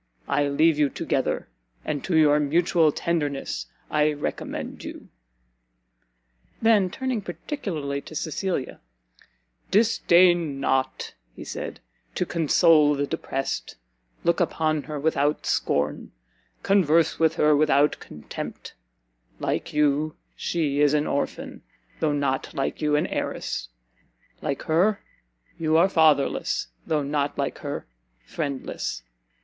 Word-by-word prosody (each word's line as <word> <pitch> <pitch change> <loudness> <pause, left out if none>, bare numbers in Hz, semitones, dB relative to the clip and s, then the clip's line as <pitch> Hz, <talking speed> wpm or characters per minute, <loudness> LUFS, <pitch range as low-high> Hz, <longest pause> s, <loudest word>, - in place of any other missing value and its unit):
I 145 - +1
leave 155 +2 +3
you 145 -2 +4
together, - - -1 0.4
and 145 -3 -2
to 175 -4 +1
your 150 -1 +5
mutual 165 +2 +3
tenderness 145 - -2 0.2
I 150 0 +3
recommend 145 - -5
you!" - - -9 1.5
Then, 215 -4 +4
turning 255 +2 -2
particularly 170 - -4
to 155 - -11
Cecilia, 155 -1 -3 0.9
"Disdain 175 -8 +4
not," 130 -1 -1 0.2
he - - -8
said, - - -6 0.3
"to - - 0
console 160 -2 +4
the 145 0 0
depressed; 135 -1 -3 0.5
look 170 0 +2
upon 155 -3 +1
her 150 +2 -6
without 150 0 +1
scorn, 75 +1 -1 0.5
converse 170 -5 +3
with 160 0 +3
her 150 -2 +4
without 145 0 +3
contempt: 75 - -8 0.7
like - - -2
you, 150 +1 +1 0.2
she 150 -5 -1
is 145 0 +4
an 150 0 +1
orphan, 140 - -3 0.4
though 155 -2 +1
not 140 -2 -1
like 135 - -2
you, 150 -1 +2
an 150 - +2
heiress; - - -3 0.7
like 140 -3 -3
her, 185 +6 +2 0.6
you 160 -1 +2
are 170 +3 +6
fatherless, 155 - +2 0.2
though 150 -2 +1
not 145 0 -1
like - - -2
her - - -5 0.4
friendless! 140 - -4
150 Hz, 115 wpm, -25 LUFS, 145-170 Hz, 1.5 s, are